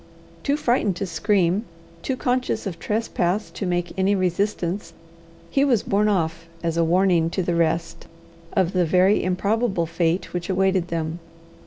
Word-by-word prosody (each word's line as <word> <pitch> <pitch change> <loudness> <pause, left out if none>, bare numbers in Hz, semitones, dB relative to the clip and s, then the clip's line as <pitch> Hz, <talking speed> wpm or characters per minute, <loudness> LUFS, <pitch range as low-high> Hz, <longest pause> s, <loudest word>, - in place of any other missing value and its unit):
Too 285 +1 0
frightened 240 - +1
to 195 - -3
scream, 185 +3 +1 0.4
too 260 +6 -2
conscious 250 -1 -1
of 175 -4 -5
trespass 210 -2 -1
to 195 - -4
make 175 0 -1
any 195 +2 +3
resistance, 185 0 -1 0.6
he 275 - +3
was 245 -7 +2
borne 205 +2 +2
off 165 -5 -1 0.2
as 165 -1 -1
a 170 - +3
warning 175 -1 +3
to 185 +2 -1
the 175 - 0
rest 165 0 -1 0.5
of 190 -4 +2
the 180 -1 +3
very 185 +4 +3
improbable 195 0 0
fate 165 +2 -1
which 175 0 -4
awaited 190 -1 +2
them. 165 -1 -3
185 Hz, 155 wpm, -23 LUFS, 170-205 Hz, 0.6 s, any